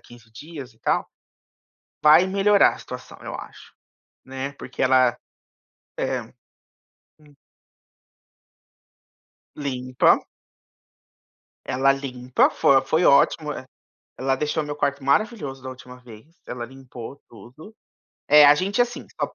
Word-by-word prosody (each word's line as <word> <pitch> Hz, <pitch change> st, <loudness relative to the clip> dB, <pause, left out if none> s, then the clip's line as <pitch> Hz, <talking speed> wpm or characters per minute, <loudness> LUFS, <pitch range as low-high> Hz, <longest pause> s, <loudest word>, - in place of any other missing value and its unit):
15 115 Hz, -2 st, -18 dB
dias 145 Hz, -1 st, -10 dB
e -, -, -31 dB
tal, -, -, -1 dB, 0.9 s
vai 155 Hz, +4 st, +6 dB
melhorar 200 Hz, +1 st, +4 dB
a -, -, -12 dB
situação, -, -, -10 dB
eu -, -, -7 dB
acho, -, -, -12 dB, 0.5 s
né. 135 Hz, +1 st, -6 dB
Porque 130 Hz, -, -7 dB
ela 130 Hz, -2 st, +3 dB, 0.8 s
É. -, -, -2 dB, 1.0 s
Hum. 145 Hz, -1 st, -21 dB, 2.2 s
Limpa. 130 Hz, -3 st, +1 dB, 1.5 s
Ela 135 Hz, +2 st, +2 dB
limpa 130 Hz, -2 st, 0 dB
Foi 135 Hz, -1 st, +3 dB
foi 160 Hz, +6 st, 0 dB
ótimo, 150 Hz, +2 st, +3 dB
e 130 Hz, -, -8 dB, 0.5 s
ela 135 Hz, 0 st, 0 dB
deixou 150 Hz, +2 st, -1 dB
meu 145 Hz, 0 st, -6 dB
quarto 140 Hz, -1 st, -1 dB
maravilhoso 140 Hz, -, -1 dB
da 130 Hz, -, -7 dB
última 125 Hz, 0 st, -12 dB
vez, 110 Hz, +1 st, -14 dB, 0.2 s
ela 120 Hz, -1 st, -6 dB
limpou 130 Hz, 0 st, -11 dB
tudo. 130 Hz, -, -15 dB, 0.5 s
É, 150 Hz, 0 st, +8 dB
a 145 Hz, -, +8 dB
gente, 200 Hz, +8 st, -1 dB
assim, 245 Hz, 0 st, -1 dB
só -, -, 0 dB
p -, -, -18 dB
135 Hz, 120 wpm, -23 LUFS, 130-150 Hz, 2.2 s, É